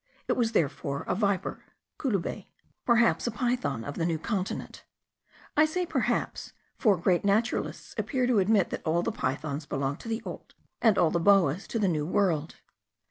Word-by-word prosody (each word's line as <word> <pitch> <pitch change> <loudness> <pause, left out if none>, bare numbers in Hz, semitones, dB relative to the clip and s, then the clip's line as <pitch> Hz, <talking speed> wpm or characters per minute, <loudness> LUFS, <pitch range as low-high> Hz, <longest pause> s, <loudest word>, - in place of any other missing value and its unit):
It - - +2
was 230 -2 0
therefore 140 -2 -1
a - - -1
viper 200 -2 -1 0.4
(coluber); 210 - -2 0.4
perhaps 235 0 +3
a - - 0
python 240 - -1
of 145 +2 -6
the 165 - 0
New 165 -2 0
Continent: 190 +3 -4 0.7
I 305 - +6
say 360 +3 -1
perhaps, - - -1 0.2
for 205 -6 +3
great 175 +1 +2
naturalists 205 +4 0
appear 260 -3 0
to 245 -4 +3
admit 195 -1 +3
that - - -3
all 170 +2 +1
the 230 - -1
pythons 145 -3 -3
belong 140 0 -2
to - - -11
the 225 +1 -2
Old, - - -8 0.3
and 225 -4 +4
all 170 -3 +4
the 170 - +1
boas 190 -2 +3
to - - -3
the 210 -3 +2
New 155 -4 0
World. 170 -5 +1
195 Hz, 175 wpm, -28 LUFS, 160-230 Hz, 0.7 s, I